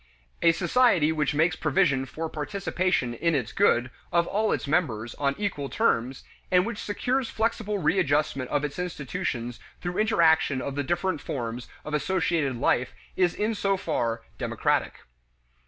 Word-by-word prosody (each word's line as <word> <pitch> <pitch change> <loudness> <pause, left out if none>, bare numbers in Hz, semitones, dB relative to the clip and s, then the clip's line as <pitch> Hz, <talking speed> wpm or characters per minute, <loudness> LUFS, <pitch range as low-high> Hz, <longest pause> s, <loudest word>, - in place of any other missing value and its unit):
A 170 - +6
society 175 -2 +3
which 150 -2 0
makes 160 +2 +3
provision 135 -3 +1
for 160 +4 -4
participation 175 - -1
in 165 +7 +1
its 125 -6 -2
good 130 -11 +3 0.2
of 170 0 +3
all 215 +4 0
its - - -1
members 120 -8 0
on 140 -1 0
equal 180 -10 -2
terms 130 - 0 0.3
and 180 0 +4
which 230 -2 -4
secures 250 +4 -1
flexible 220 -2 -1
readjustment 150 -6 +1
of 145 -1 0
its 150 +4 -4
institutions 130 -8 -3 0.2
through 175 0 -3
interaction 165 -10 +3
of 140 +1 -4
the 145 - -1
different 175 +5 -1
forms 120 -6 -4 0.2
of 150 - -5
associated 160 -4 0
life 125 +1 +1 0.2
is 180 -2 +2
in 215 +2 0
so 195 -2 0
far 115 -11 -1 0.2
democratic. - - 0
160 Hz, 150 wpm, -26 LUFS, 135-190 Hz, 0.3 s, A